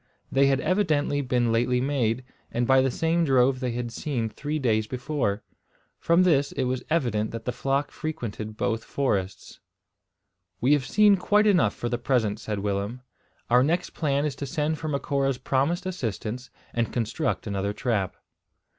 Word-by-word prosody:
They 135 +1 +4
had 135 -1 +2
evidently 155 -5 +1
been 125 -3 +1
lately 125 +2 +2
made, 125 -3 0 0.3
and 120 +1 0
by 130 +1 +5
the 135 - +2
same 165 +6 +1
drove 130 -2 +3
they 125 -2 -2
had 120 -1 -3
seen 120 -4 -2
three 150 +7 -4
days 110 -6 +1
before. 125 -5 -2 0.6
From 170 +2 +4
this 145 -6 +3
it - - -1
was 130 0 -1
evident 120 -10 +1
that 115 -1 -7
the 125 - 0
flock 135 +3 -1
frequented 110 -9 -5
both 115 0 -1
forests. 100 -9 -2 1.0
"We 130 +4 +4
have 140 -4 +1
seen 210 -1 +5
quite 210 +3 +3
enough 175 - +3
for 120 - -3
the 120 0 -2
present," 115 -5 +1
said 105 -2 -4
Willem. 100 +4 -2 0.5
"Our 125 +1 +5
next 170 +6 0
plan 145 -2 0
is 150 - -2
to 140 - -4
send 155 +1 -1
for 155 - -4
Macora's 140 -2 0
promised 140 +8 0
assistance, 125 - -4 0.2
and 115 -1 -1
construct 120 +7 -1
another 100 -1 -1
trap." 105 -4 -1
130 Hz, 165 wpm, -26 LUFS, 115-150 Hz, 1.0 s, by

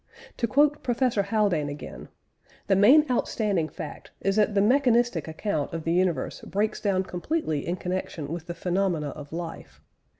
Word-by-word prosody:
To 235 - 0
quote 290 +5 +3
Professor 245 -3 +1
Haldane 200 -8 +1
again, 145 - -8 0.6
"The 195 - +3
main 255 +11 +7
outstanding 205 -9 0
fact 160 -5 -8
is 195 0 0
that 210 -1 +2
the - - +4
mechanistic 240 - +3
account 160 -2 -2
of 165 -1 -4
the 165 - 0
universe 175 -6 0
breaks 210 +2 -2
down 190 -2 +1
completely 180 - -2
in 175 - 0
connection 180 -4 -4
with 170 0 -6
the 170 - -5
phenomena 180 -4 0
of 145 +1 -9
life.... 165 0 -7
185 Hz, 160 wpm, -26 LUFS, 165-220 Hz, 0.6 s, main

